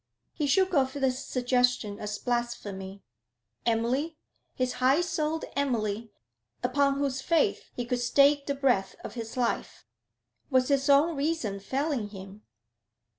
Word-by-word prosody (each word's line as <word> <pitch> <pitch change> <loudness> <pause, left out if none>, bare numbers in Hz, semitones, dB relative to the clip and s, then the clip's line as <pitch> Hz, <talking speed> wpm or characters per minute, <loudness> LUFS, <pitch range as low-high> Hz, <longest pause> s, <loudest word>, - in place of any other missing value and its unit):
He 295 - -1
shook 375 +5 +3
off 265 -4 +2
this 265 -2 0
suggestion 245 -4 +1
as 210 0 -4
blasphemy. 205 -6 -3 0.6
Emily? 250 +8 0 0.4
His 255 -1 0
high 270 +6 +4
souled 320 -2 -1
Emily, 225 -5 -1 0.5
upon 275 +2 +2
whose 275 -2 -1
faith 330 +1 +1
he 245 - -3
would 245 +1 -1
stake 280 +3 +4
the 280 - 0
breath 245 -9 +1
of - - -7
his 230 +1 -6
life? 245 -2 -2 0.6
Was 260 -1 +3
his 275 0 +2
own 295 +4 +5
reason 275 -9 -1
failing 265 +1 -2
him? 195 +1 -10
255 Hz, 130 wpm, -28 LUFS, 230-280 Hz, 0.6 s, own